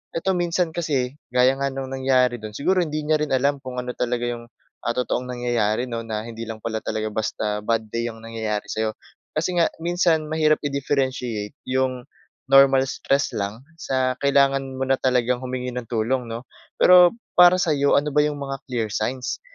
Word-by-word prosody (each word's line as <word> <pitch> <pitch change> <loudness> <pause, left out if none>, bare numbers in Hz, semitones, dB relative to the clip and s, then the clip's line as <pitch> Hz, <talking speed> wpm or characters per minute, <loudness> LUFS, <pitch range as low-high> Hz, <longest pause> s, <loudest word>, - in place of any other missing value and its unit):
eto 190 +3 0
minsan 175 -1 0
kasi 140 -6 -1 0.2
gaya 125 +1 +4
nga 140 - +1
ng 135 0 -5
nangyari 130 -2 +2
dun. 110 0 -7
Siguro 185 +6 +1
hindi 155 -1 -3
niya 155 0 +2
rin 150 -2 -2
alam 140 +2 +1
kung 125 -1 -5
ano 125 0 -5
talaga 120 0 -1
yung, 120 -1 -4 0.4
ah, 120 - 0
totoong 125 0 -1
nangyayari 120 -1 0
'no? 115 0 -2
Na 110 -1 -3
hindi 115 0 -7
lang 110 -1 -6
pala 110 -1 -2
talaga 110 0 -3
basta 105 -1 -2
bad 115 0 0
day 115 0 -1
yung 115 0 -14
nangyayari 110 -2 -3
sa 110 - -4
'yo. - - 0 0.5
Kasi 180 - 0
nga 170 - +3
minsan 170 -2 +1
mahirap 155 -1 +2
i-differenciate 130 -6 -2
yung 130 -1 0 0.5
normal 135 -1 +7
stress 140 +1 0
lang 105 +5 -4 0.2
sa 130 -2 -1
kailangan 135 -1 +2
mo 135 - -2
na 135 0 +1
talagang 125 -1 +1
humingi 125 -1 -4
ng 125 -2 -6
tulong 120 +2 -1
'no? 115 +2 -6 0.3
Pero 180 0 +7 0.3
para 180 +1 +8
sa'yo, 145 -5 +2
ano 150 +1 0
ba 150 - +5
yung 150 -1 0
mga 135 -1 -5
clear 115 -3 -1
signs 125 +3 -2
130 Hz, 185 wpm, -23 LUFS, 120-140 Hz, 0.5 s, para